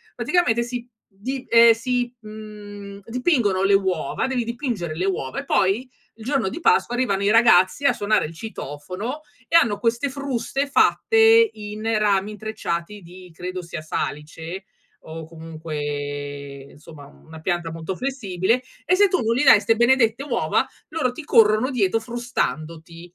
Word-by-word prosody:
Praticamente 240 -10 +1
si 240 0 -6 0.2
di, 255 +7 -6
ehm, 230 0 +7
si, 245 +1 -2
mhmm, 205 -2 -10
dipingono 235 - +1
le 195 0 +4
uova, 185 -7 -1
devi 255 -2 -1
dipingere 235 - -4
le 180 +3 -2
uova 135 -9 -2
e - - -14
poi 200 +7 +1 0.3
il 220 - -12
giorno 260 -7 0
di 335 - -6
Pasqua 445 - +2
arrivano 200 -6 0
i 200 - +2
ragazzi 225 +1 +4
a - - +5
suonare 210 +1 +1
il 160 - -8
citofono 190 - -6 0.3
e 335 - -1
hanno 230 -11 +5
queste 235 +5 0
fruste 275 0 -2
fatte 450 +8 +4
in 210 0 -8 0.2
rami 205 0 +1
intrecciati 210 -3 -5
di 180 +1 -13
credo 180 +2 -6
sia 170 -2 -7
salice 160 +4 -5 0.4
o 160 0 -8
comunque 145 -3 -6
insomma 150 -1 -13
una 160 +3 -14
pianta 175 0 -2
molto 165 +3 -5
flessibile 230 -3 -1 0.2
e 365 - +2
se 405 +1 +5
tu 365 -1 0
non 230 +1 +1
gli 260 - +1
dai 215 -5 +8
ste 225 +2 +2
benedette 240 0 +3
uova 295 - 0 0.2
loro 300 -6 -1
ti 300 +5 -9
corrono 220 -1 +4
dietro 225 -4 +1
frustandoti. 170 -9 -4
210 Hz, 155 wpm, -22 LUFS, 170-245 Hz, 0.4 s, dai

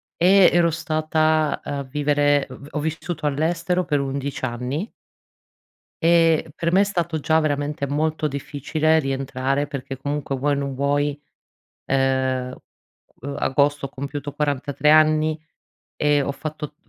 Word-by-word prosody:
E 190 +2 +6
ero 170 -1 +4
stata 155 -1 0
a 140 -1 -4
vivere 145 +1 +1
v 140 +2 -11
ho 150 - -2
vissuto 160 +1 -4
all'estero 165 +5 0
per 150 -4 0
11 140 0 -3
anni. 130 - -3 1.1
E 165 -1 +4
per 170 0 -1
me 190 - +5
è - - +5
stato 170 -5 -2
già 160 +2 +2
veramente 145 -1 -1
molto 155 +2 -1
difficile 150 +3 0
rientrare 135 0 -1
perché 135 -2 -6
comunque 140 0 -3
vuoi 145 +3 0
o - - -2
non 140 -1 -3
vuoi, 145 +1 0 0.7
ehm, 130 -1 0 0.8
agosto 145 +1 +1
ho 135 - -6
compiuto 140 +1 -6
43 145 0 0
anni 155 0 +4 0.6
e 145 -1 +2
ho 140 - -2
fatto 150 0 -6
145 Hz, 130 wpm, -22 LUFS, 140-155 Hz, 1.1 s, E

